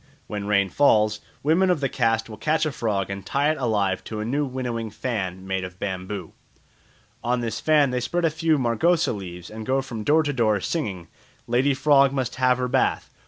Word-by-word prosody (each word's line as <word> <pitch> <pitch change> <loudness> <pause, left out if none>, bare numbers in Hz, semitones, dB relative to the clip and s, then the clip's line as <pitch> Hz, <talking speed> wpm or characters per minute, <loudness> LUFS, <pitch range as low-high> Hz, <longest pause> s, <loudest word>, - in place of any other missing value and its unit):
When 105 -1 -5
rain 100 -2 +2
fails, 105 -4 +3 0.2
women 170 +6 +3
of 180 -4 +2
the 135 - 0
caste 115 -3 0
will 110 -1 -9
catch 155 +1 +1
a 155 - -1
frog 100 -6 -2
and 100 0 -5
tie 140 +9 +1
it 155 - -4
alive 105 -7 0
to 110 - -5
a 105 - -3
new 140 +5 0
winnowing 120 -3 -3
fan 95 -5 -4
made 95 -1 -2
of 90 0 -8
bamboo. 95 0 -5 0.9
On 120 +1 0
this 115 -2 -3
fan 150 -4 +3
they 125 - 0
spread 175 +7 -1
a 160 - +2
few 160 0 +1
margosa 140 +8 +2
leaves 90 -3 -8
and 110 0 -7
go 130 +4 +1
from 115 -5 -6
door 155 +6 +4
to 145 -1 -1
door 110 -5 +2
singing, 95 - -3 0.4
"Lady 130 +4 +2
frog 140 -1 +4
must 130 -3 -2
have 130 -1 +3
her 125 0 -1
bath. 130 +1 0
120 Hz, 205 wpm, -24 LUFS, 105-140 Hz, 0.9 s, door